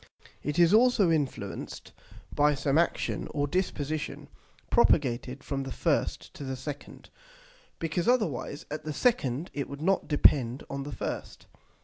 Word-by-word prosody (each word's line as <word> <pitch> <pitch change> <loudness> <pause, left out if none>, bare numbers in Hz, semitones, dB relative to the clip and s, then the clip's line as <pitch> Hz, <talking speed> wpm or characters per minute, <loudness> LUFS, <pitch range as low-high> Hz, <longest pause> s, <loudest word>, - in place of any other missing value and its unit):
It 150 - -3
is 170 +2 +5
also 220 -6 +5
influenced 135 -10 -3 0.4
by 150 0 +3
some 140 +2 +2
action 170 - 0
or 145 -1 +1
disposition, 155 -3 -2 0.4
propagated 130 0 +2
from 140 -2 -2
the 135 0 -5
first - - -1
to - - -8
the 130 -1 -3
second, 140 +2 -8 0.7
because 165 +3 -2
otherwise 210 - 0
at 155 +1 -4
the 155 - -4
second 160 - +1
it 140 - -3
would 140 +2 -7
not 190 +2 +2
depend 135 -4 +3
on 140 0 -3
the 145 +1 -6
first. - - -5
145 Hz, 140 wpm, -29 LUFS, 135-170 Hz, 0.7 s, is